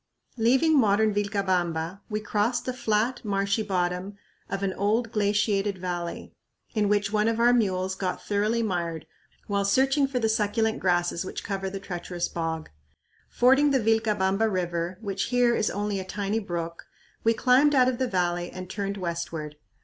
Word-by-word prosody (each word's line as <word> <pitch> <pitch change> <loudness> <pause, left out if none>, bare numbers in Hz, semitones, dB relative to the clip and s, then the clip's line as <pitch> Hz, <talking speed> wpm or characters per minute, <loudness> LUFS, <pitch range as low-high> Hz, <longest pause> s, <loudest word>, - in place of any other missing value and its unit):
Leaving 265 +7 +4
modern 215 -1 +3
Vilcabamba, 190 -4 -1
we 210 -1 -1
crossed 215 +3 0
the 255 - -2
flat, 230 +1 0
marshy 200 0 0
bottom 185 0 -2 0.3
of 195 0 -3
an 190 -1 0
old 220 +4 0
glaciated 205 -2 +1
valley, 175 -2 -5 0.4
in 210 -2 +1
which 205 0 +1
one 210 0 +2
of 230 0 0
our 240 +1 +5
mules 190 -5 +1
got 190 -1 -3
thoroughly 210 +3 0
mired 170 -6 -2 0.4
while 200 -1 0
searching 270 +7 +3
for 270 -2 -3
the 225 -2 +1
succulent 220 +1 +1
grasses 175 -1 +1
which 185 - -6
cover 195 -2 -3
the 195 +1 -5
treacherous 175 -2 -4
bog. 165 -1 -4 0.6
Fording 270 +4 +4
the 270 -2 +3
Vilcabamba 220 -2 +2
River, 175 -1 -2
which 200 -3 -2
here 245 -1 +3
is 215 - +1
only 205 0 -2
a - - -4
tiny 200 +3 -2
brook, 170 -4 -5 0.4
we 230 0 +3
climbed 270 +5 +4
out 255 -1 +5
of 255 -1 -1
the 260 - +1
valley 175 -3 -1
and 185 0 -8
turned 200 0 -3
westward. 170 -4 -4
205 Hz, 165 wpm, -26 LUFS, 185-225 Hz, 0.6 s, our